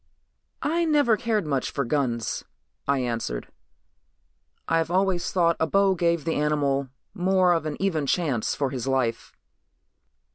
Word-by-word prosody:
"I 335 Hz, +3 st, +1 dB
never 290 Hz, -8 st, +3 dB
cared 215 Hz, -4 st, -1 dB
much 140 Hz, -4 st, -1 dB
for 140 Hz, -, -2 dB
guns," 120 Hz, -3 st, -1 dB, 0.4 s
I 140 Hz, 0 st, +2 dB
answered. 115 Hz, -, -3 dB, 1.2 s
"I've 165 Hz, 0 st, +1 dB
always 185 Hz, -1 st, +1 dB
thought 170 Hz, -2 st, +2 dB
a 160 Hz, -, +1 dB
bow 195 Hz, +2 st, +3 dB
gave 170 Hz, -3 st, 0 dB
the 165 Hz, -, 0 dB
animal 140 Hz, -2 st, 0 dB, 0.2 s
more 185 Hz, -1 st, +3 dB
of 165 Hz, -2 st, -1 dB
an 150 Hz, -, -5 dB
even 165 Hz, -7 st, 0 dB
chance 140 Hz, -9 st, 0 dB
for 140 Hz, -2 st, -1 dB
his 130 Hz, -1 st, -4 dB
life." 130 Hz, -4 st, -1 dB
160 Hz, 140 wpm, -25 LUFS, 135-185 Hz, 1.2 s, never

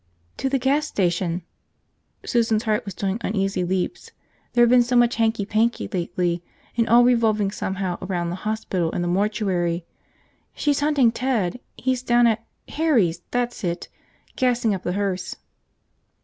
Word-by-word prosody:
"To 270 Hz, -, -1 dB
the 270 Hz, -, +2 dB
gas 280 Hz, +4 st, +1 dB
station." 175 Hz, -, -1 dB, 0.8 s
Susan's 225 Hz, -2 st, +1 dB
heart 215 Hz, -2 st, 0 dB
was 200 Hz, -3 st, -6 dB
doing 195 Hz, +2 st, -2 dB
uneasy 195 Hz, -4 st, -1 dB
leaps. 190 Hz, -, -2 dB, 0.4 s
There 240 Hz, 0 st, +5 dB
had 240 Hz, -, +5 dB
been 250 Hz, -1 st, +7 dB
so 245 Hz, +1 st, 0 dB
much 240 Hz, -1 st, +4 dB
hanky 225 Hz, -2 st, +1 dB
panky 220 Hz, +3 st, 0 dB
lately, 175 Hz, -1 st, -1 dB, 0.3 s
and 230 Hz, -1 st, +1 dB
all 240 Hz, +1 st, +7 dB
revolving 220 Hz, -5 st, +3 dB
somehow 190 Hz, -3 st, -3 dB
around 175 Hz, -2 st, -2 dB
the 175 Hz, -, -4 dB
hospital 190 Hz, -5 st, -2 dB
and 175 Hz, -, -2 dB
the -, -, -1 dB
mortuary. 180 Hz, -3 st, 0 dB, 0.7 s
"She's 290 Hz, -2 st, +1 dB
hunting 290 Hz, -5 st, +3 dB
Ted. 235 Hz, -5 st, -1 dB, 0.2 s
He's 255 Hz, -1 st, 0 dB
down 240 Hz, -1 st, +3 dB
at 225 Hz, -1 st, +2 dB, 0.2 s
– -, -, -46 dB
Harry's, 230 Hz, -, +1 dB
that's 245 Hz, -2 st, -2 dB
it! 175 Hz, -1 st, -3 dB, 0.2 s
– -, -, -34 dB
gassing 245 Hz, -4 st, +2 dB
up 190 Hz, -, -3 dB
the 175 Hz, -, -2 dB
hearse." 190 Hz, -2 st, -2 dB
215 Hz, 160 wpm, -23 LUFS, 185-240 Hz, 0.8 s, been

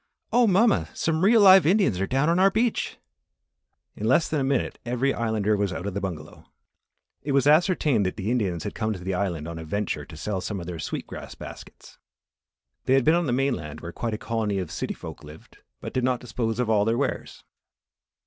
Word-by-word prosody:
"Oh, 245 Hz, -1 st, +5 dB
mamma! 210 Hz, +3 st, +3 dB
Some 160 Hz, +1 st, 0 dB
real 220 Hz, +3 st, +6 dB
live 190 Hz, -2 st, +8 dB
Indians 185 Hz, -, +3 dB
are 95 Hz, -, 0 dB
down 135 Hz, +3 st, +1 dB
on 170 Hz, +2 st, +2 dB
our 195 Hz, +1 st, +6 dB
beach." 225 Hz, +3 st, -1 dB, 1.0 s
In 110 Hz, -, -3 dB
less 130 Hz, +7 st, +3 dB
than 155 Hz, -, -1 dB
a -, -, 0 dB
minute 135 Hz, 0 st, -1 dB
every 125 Hz, +3 st, 0 dB
Islander 110 Hz, -2 st, 0 dB
was 100 Hz, -1 st, -1 dB
out 90 Hz, -, -5 dB
of 100 Hz, -, -3 dB
the 100 Hz, -, -3 dB
bungalow. 80 Hz, -5 st, -7 dB, 0.7 s
It 140 Hz, 0 st, -3 dB
was 140 Hz, -1 st, +3 dB
ascertained 150 Hz, -, +3 dB
that 90 Hz, -, -4 dB
the 105 Hz, +2 st, -2 dB
Indians 95 Hz, -9 st, -1 dB
had -, -, -4 dB
come 110 Hz, 0 st, -2 dB
to 95 Hz, -, -7 dB
the 95 Hz, +2 st, -3 dB
Island 90 Hz, -5 st, -2 dB
on 85 Hz, -1 st, -6 dB
a -, -, -7 dB
venture 100 Hz, +6 st, -3 dB
to 80 Hz, -, -12 dB
sell 95 Hz, +3 st, -3 dB
some 100 Hz, +1 st, -4 dB
of 85 Hz, -, -7 dB
their 85 Hz, -1 st, -6 dB
sweet -, -, -4 dB
grass -, -, -9 dB
baskets. -, -, -12 dB, 0.9 s
They 130 Hz, -, +3 dB
had 135 Hz, -, +2 dB
been 160 Hz, -, +5 dB
on 170 Hz, -2 st, +1 dB
the -, -, 0 dB
mainland 120 Hz, -, -2 dB
where 85 Hz, -, -7 dB
quite 115 Hz, +4 st, -3 dB
a -, -, -5 dB
colony 110 Hz, -3 st, -2 dB
of 90 Hz, -4 st, -4 dB
city -, -, -4 dB
folk -, -, -10 dB
lived, 75 Hz, +1 st, -14 dB, 0.2 s
but -, -, -7 dB
did 130 Hz, -, 0 dB
not 125 Hz, -1 st, +1 dB
dispose 115 Hz, -2 st, -3 dB
of 125 Hz, -, +1 dB
all 105 Hz, -2 st, +3 dB
their 115 Hz, +2 st, +1 dB
wares. 140 Hz, +1 st, -3 dB
115 Hz, 220 wpm, -25 LUFS, 95-145 Hz, 1.0 s, live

